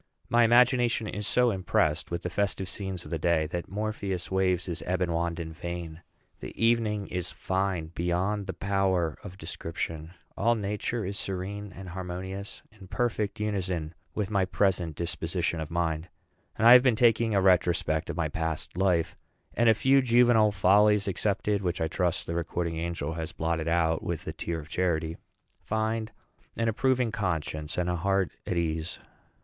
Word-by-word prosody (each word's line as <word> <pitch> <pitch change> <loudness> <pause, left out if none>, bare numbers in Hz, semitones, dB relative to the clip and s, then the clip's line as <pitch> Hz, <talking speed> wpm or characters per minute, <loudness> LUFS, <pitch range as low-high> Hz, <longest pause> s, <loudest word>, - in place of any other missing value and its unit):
My 120 0 +5
imagination 120 0 +4
is 105 0 -3
so 125 -1 +3
impressed 90 -5 0
with 85 +1 -3
the 90 - -2
festive 100 -1 -1
scenes 95 -3 -4
of - - -10
the 80 - -1
day 80 -1 +2
that 85 +2 -5
Morpheus 100 -3 -3
waves 95 -2 +1
his 85 -1 -4
ebon 90 -1 0
wand 85 0 -1
in 80 -1 -5
vain. 85 -1 -6 0.4
The - - -9
evening 115 -3 +2
is 90 -1 -3
fine 95 -4 -2
beyond 90 +4 -1
the 95 - -3
power 95 -4 0
of 95 -2 -9
description; 80 -1 -5 0.2
all 120 +1 +2
Nature 105 +1 -2
is 100 +2 -3
serene 100 +2 -4
and 95 0 -9
harmonious, 95 +2 -6
in 100 -3 -14
perfect 110 -1 -1
unison 95 -6 -2 0.2
with 105 -1 -2
my 100 -2 +2
present 90 -4 +1
disposition 85 +1 -2
of 80 -1 -4
mind. 85 0 -1 0.5
I 115 +3 +8
have 125 - +10
been 125 -3 +3
taking 115 -1 +3
a - - +5
retrospect 90 -4 +2
of - - -4
my 85 -2 +1
past 80 +1 -3
life, 90 -3 +1 0.4
and, 120 -1 +4
a 110 - +6
few 135 +4 +4
juvenile 120 -3 +5
follies 100 +1 +4
excepted, 100 +1 0
which 90 -2 -1
I 80 - +1
trust 90 +1 -1
the 85 - -4
recording 85 0 -2
angel 85 -2 -3
has 80 -1 -5
blotted 80 0 -1
out 80 -1 +2
with - - -4
a - - -4
tear 85 -1 -3
of 75 - -10
charity, 80 -2 -1 0.4
find 110 0 -2 0.5
an 115 - +1
approving 125 +1 +1
conscience 80 -8 -2
and 90 -1 0
a 90 0 0
heart 95 +1 +1 0.2
at 90 - -1
ease. 80 0 -2
95 Hz, 170 wpm, -28 LUFS, 85-105 Hz, 0.5 s, have